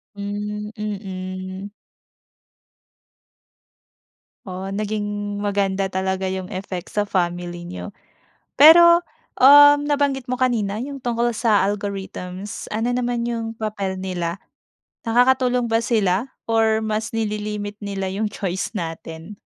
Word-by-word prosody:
Hmm, 210 +1 -4
mm. 190 -1 -6 2.7
Oh, 185 0 -6
naging 205 -1 -3
maganda 200 -1 0
talaga 190 0 -2
yung 185 0 -3
effect 185 -1 -6
sa 205 0 0
family 175 -2 -2
niyo. 180 +3 -8 0.6
Pero, 340 +3 +8 0.4
um, 290 +2 +9
nabanggit 280 -3 0
mo 255 - -1
kanina 230 -6 0
yung 275 +3 -5
tungkol 240 0 0
sa 215 -3 +2
algorithms. 195 -1 -5
Ano 225 +3 -1
naman 245 -1 -1
yung 230 -1 -3
papel 200 -4 -3
nila? 180 -2 -3 0.7
Nakakatulong 250 +1 +3
ba 225 0 +1
sila 215 +1 +1 0.2
or 225 -1 +3
mas 220 +1 -2
nililimit 210 -2 -3
nila 195 -1 -3
yung 205 +2 -2
choice 190 -2 -3
natin? 165 -1 -6
205 Hz, 110 wpm, -22 LUFS, 190-230 Hz, 2.7 s, um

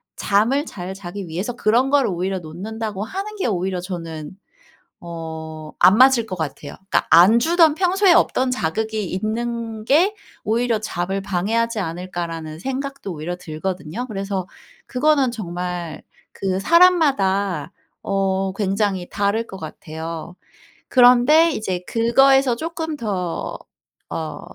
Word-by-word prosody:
잠을 230 +9 +1
잘 185 - -7
자기 190 0 -7
위해서 185 +9 -3
그런 240 +5 +2
거를 280 -1 +3
오히려 185 +1 -2
놓는다고 205 +5 -5
하는 395 - -5
게 395 - -1
오히려 185 -3 -1
저는 165 -4 -6 0.7
어 160 -2 -7
안 200 - +6
맞을 260 -3 +6
것 190 -4 -5
같아요. 145 -2 -5 0.2
그러니까 - - +2
'안 180 +7 +7
주던 325 +2 +4
평소에 380 +2 +3
없던 260 -6 +2
자극이 220 +1 -2
있는 225 +3 -3
게 350 - +3 0.3
오히려 230 0 +1
잠을 195 -1 -3
방해하지 215 +5 -1
않을까?'라는 165 -3 -5
생각도 270 -2 -4
오히려 165 +3 -4
들거든요. 180 +6 -5
그래서 195 -4 -3 0.4
그거는 275 0 +2
정말 180 -6 -5 0.3
그 190 -1 -2
사람마다 200 - +3 0.3
어 195 -1 0
굉장히 195 -2 -1
다를 205 +3 0
것 190 - -9
같아요. 165 0 -7 0.6
그런데 250 +6 +6
이제 185 -8 -3
그거에서 265 +2 +4
쪼끔 320 +2 -4
더 190 - -3 0.5
어 160 -1 -4
200 Hz, 275 characters per minute, -21 LUFS, 175-245 Hz, 0.7 s, 안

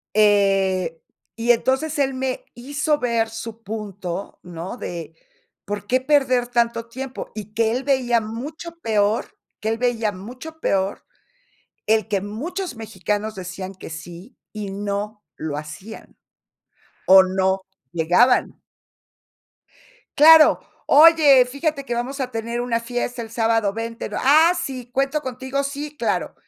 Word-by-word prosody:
eh, 195 -5 +3 0.4
y 235 +1 +4
entonces 265 +6 0
él 270 -1 +1
me 260 0 -3
hizo 285 +5 -1
ver 230 -4 0
su 225 0 -8
punto, 200 -4 -6
¿no? 175 +4 -7
De 170 -7 -7 0.5
¿por 205 0 -5
qué 255 +4 +2
perder 260 -3 +2
tanto 235 -1 0
tiempo? 260 +2 -7
Y 210 -1 -8
que 225 0 +2
él 255 +3 -2
veía 250 -4 +2
mucho 290 +10 -7
peor 215 -3 0 0.2
que 215 - -2
él 225 +1 0
veía 235 -3 0
mucho 250 +11 -10
peor 195 -8 -1 0.8
el 220 0 +2
que 200 -3 0
muchos 310 - -5
mexicanos 215 -1 -3
decían 185 +1 -6
que 185 - -10
sí 175 +8 -10 0.2
y 210 -2 -5
no 205 +1 -4
lo 155 -2 -4
hacían, 155 +9 -9 0.9
o 190 0 +9
no 190 +1 0 0.3
llegaban. 175 +9 +3 1.6
Claro. 310 +1 +8 0.3
"Oye, 295 -4 +7
fíjate 280 +2 -2
que 240 - -2
vamos 255 +4 -3
a 255 -1 -2
tener 230 +1 -3
una 240 -1 0
fiesta 245 0 -3
el 225 - -9
sábado, 225 -2 +1
vente", 230 +2 -5
¿no? - - -3
"Ah, 310 +6 +6
sí, 255 -7 -6
¿cuento 275 +3 0
contigo?". 260 +1 -3
"Sí, 290 +2 -5
claro". 235 -4 -1
230 Hz, 135 wpm, -22 LUFS, 205-265 Hz, 1.6 s, o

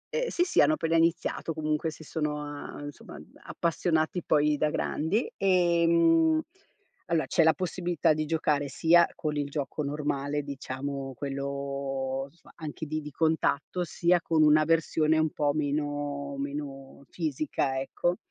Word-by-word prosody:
Ehm, - - 0
sì, 350 - +1
sì 360 - +3
hanno 150 +2 +5
appena 165 +1 0
iniziato, 165 0 +1
comunque 155 +1 -1
si 160 +1 -10
sono 150 -1 -3
a 145 0 -7
insomma 145 0 -9
a - - -9 0.3
appassionati 165 0 0
poi 150 0 +2
da 150 +1 +1
grandi. 165 - -1
Ehm, 170 -3 +4 0.7
allora 165 -3 +1
c'è - - +2
la 160 0 +5
possibilità 175 -3 0
di 155 0 -2
giocare 150 -3 +1
sia 165 +5 +4
con 150 -1 -3
il 145 -1 -1
gioco 145 +1 -3
normale, 145 0 -2
diciamo 135 0 -5
quello, 140 -1 -3
somma, 170 - -21
anche 155 0 -6
di 155 +1 -3
di 150 - -7
contatto, 160 +3 0
sia 175 +1 +2
con 160 -2 +2
una 155 0 +5
versione 160 -1 +2
un 155 -1 +2
po' 145 -1 +1
meno 145 -1 -2
meno 140 -1 -6
fisica, 145 -4 -1
ecco. 175 +6 -1
150 Hz, 145 wpm, -28 LUFS, 140-165 Hz, 0.7 s, hanno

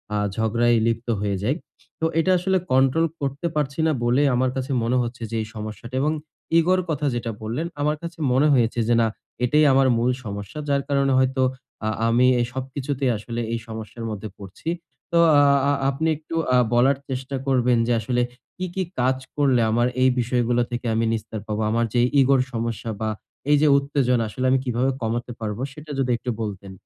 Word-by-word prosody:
আ - - +1 0.2
ঝগড়ায় 115 +2 +2
লিপ্ত 115 +1 -1
হয়ে 100 -1 0
যাই। 130 +7 +1 0.4
তো 160 - 0
এটা 185 +3 +2
আসলে 190 +2 +1
কন্ট্রোল 135 +5 +4 0.2
করতে 140 +4 -2
পারছি 145 0 -1
না - - +3
বলেই 125 +5 +3
আমার 130 +1 +2
কাছে 130 +1 -3
মনে 120 +2 +1
হচ্ছে 120 0 -5
যে - - -3
এই 110 - -5
সমস্যাটা। 110 +3 -7
এবং 150 - +2 0.5
ইগোর 185 +3 +3
কথা 150 -2 -1
যেটা 115 -1 -3
বললেন, 120 +10 -3
আমার 150 +1 +1
কাছে 170 0 -7
মনে 135 +4 +4
হয়েছে 120 -2 +2
যে 120 - +3
না 115 - +3 0.4
এটাই 150 +5 +4
আমার 135 0 +4
মূল 120 +2 +2
সমস্যা। 100 +6 -6
যার 140 -1 +2
কারণে 140 -1 +2
হয়তো 130 0 +1 0.5
আ - - +2 0.2
আমি 120 +2 +4
এ - - +3
সবকিছুতেই 130 0 -2
আসলে 115 +3 -6
এই 115 - -1
সমস্যার 110 +1 -7
মধ্যে 105 +1 -6
পড়ছি। 100 - -7 0.4
তো 170 - +2 0.2
আ - - +6 0.5
আপনি 140 +4 -1
একটু 160 +2 -8 0.2
আ - - +6 0.2
বলার 130 +3 +4
চেষ্টা 130 +1 -4
করবেন 125 -2 +3
যে 120 - +2
আসলে 125 +3 0 0.4
কি, 185 - -3
কি, 190 - 0 0.2
কাজ 130 +1 +2 0.2
করলে 135 -4 +3
আমার 120 +2 +2
এই 130 - +6
বিষয়গুলো 120 0 +1
থেকে 120 0 -4
আমি 115 +1 +1
নিস্তার 110 -1 -4
পাবো। 105 0 -2
আমার 115 +1 +2
যে 120 - +2 0.2
ইগোর 135 0 +4
সমস্যা 115 0 -3
বা 110 - 0 0.4
এই 150 - +6
যে 155 - +5
উত্তেজনা 135 -4 +1
আসলে 130 +4 -3
আমি 130 - +4
কিভাবে 125 +2 +1
কমাতে 120 +2 -2
পারবো 110 0 -4
সেটা 150 0 -10
যদি 130 -2 +1
একটু 125 - -6
বলতেন। 100 -3 -5
125 Hz, 190 wpm, -23 LUFS, 115-140 Hz, 0.5 s, আ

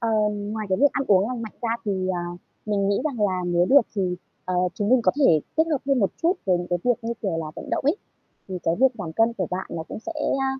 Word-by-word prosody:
Ờm, 210 -2 0
ngoài 215 -1 -3
cái 185 - +1
việc 285 - +6
ăn 275 - -1
uống 200 +2 +4
lành 245 -2 -4
mạnh 220 - -6
ra 230 - 0
thì, 205 - 0 0.2
ờ, 175 -1 -3 0.3
mình 200 -2 +1
nghĩ 200 - +2
rằng 240 -9 +1
là 185 -1 -1
nếu 175 0 +2
được 280 +6 +7 0.2
thì, 195 - +1 0.4
ờ, 185 0 -2 0.2
chúng 205 - -1
mình 255 +1 +5
có - - +3
thể 165 - +5 0.2
kết 320 - +5
hợp 295 - +2
thêm 275 -2 +3
một 200 - +2
chút 340 +2 +4
với 185 -2 +3
những 175 - -4
cái 175 - +1
việc 245 - +4
như 230 +1 -2
kiểu 190 -6 -1
là 160 - -3
vận - - -7
động - - -1
ấy, 305 +8 +3 0.5
thì 185 - -4
cái 165 - +1
việc 265 - +8
giảm 160 -3 -5
cân 225 +5 +3
của 185 -6 -2
bạn 185 +1 -3
nó 165 -1 -4
cũng - - -6
sẽ, 335 +8 -5 0.3
à, 270 - +1
205 Hz, 280 wpm, -24 LUFS, 185-240 Hz, 0.5 s, việc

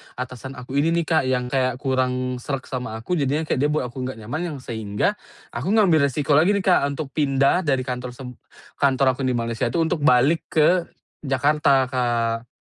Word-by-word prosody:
atasan 125 +1 -7
aku 130 +2 -6
ini 165 +3 +2
nih, - - -2
Kak, 160 -2 +1
yang 125 -1 0
kayak 130 -1 0
kurang 130 -1 -1
sreg 135 +1 -4
sama 125 -3 -4
aku. 180 +8 -2
Jadinya 145 +2 0
kayak 145 - -1
dia 145 - +3
buat 150 -5 -1
aku 125 +1 -6
nggak 115 -4 -7
nyaman 135 +9 -4
yang - - -7
sehingga 105 -4 -2 0.3
aku 120 +8 -5
ngambil 175 -10 +4
resiko 140 +2 +1
lagi 180 +6 +4
nih, 200 - -1
Kak, 180 -7 +3
untuk 150 -2 -5
pindah 140 +4 +2
dari 135 -3 +1
kantor 125 -1 -5
seb 125 0 -9 0.5
kantor 135 -2 +2
aku 135 - -2
yang 130 - +1
di - - 0
Malaysia 115 -1 -2
itu, 170 - 0
untuk 165 0 0
balik 140 +4 +3
ke 155 -2 +5 0.6
Jakarta, 140 -1 +2
Kak. 120 -2 -1
130 Hz, 200 wpm, -22 LUFS, 125-150 Hz, 0.6 s, ke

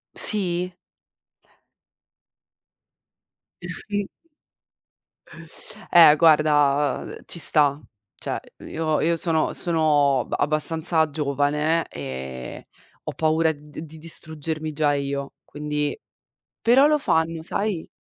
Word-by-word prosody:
Sì? 180 -3 0 2.9
Eh - - -8
sì. 205 -1 -4 1.8
Eh, 165 -3 +8
guarda, 145 -3 +3
uhm, - - -9
ci 170 - -5
sta. 150 -2 +5 0.4
Cioè, - - -4 0.3
io 155 -1 -2
io 170 +1 +1
sono 165 -1 -1
sono 150 -6 +1
ba - - -3
abbastanza 160 +2 +1
giovane 150 +2 -1
e 65 -2 -8 0.4
ho - - -6
paura 160 0 +1
d 150 0 -13
di 160 +1 -13
distruggermi 155 -1 -2
già 145 -1 +1
io, 140 0 -4
quindi 150 0 -4 0.6
però, 260 +5 +4
lo 300 - +2
fanno, 160 - -1
sai? 200 -2 -2
155 Hz, 95 wpm, -23 LUFS, 145-165 Hz, 2.9 s, Eh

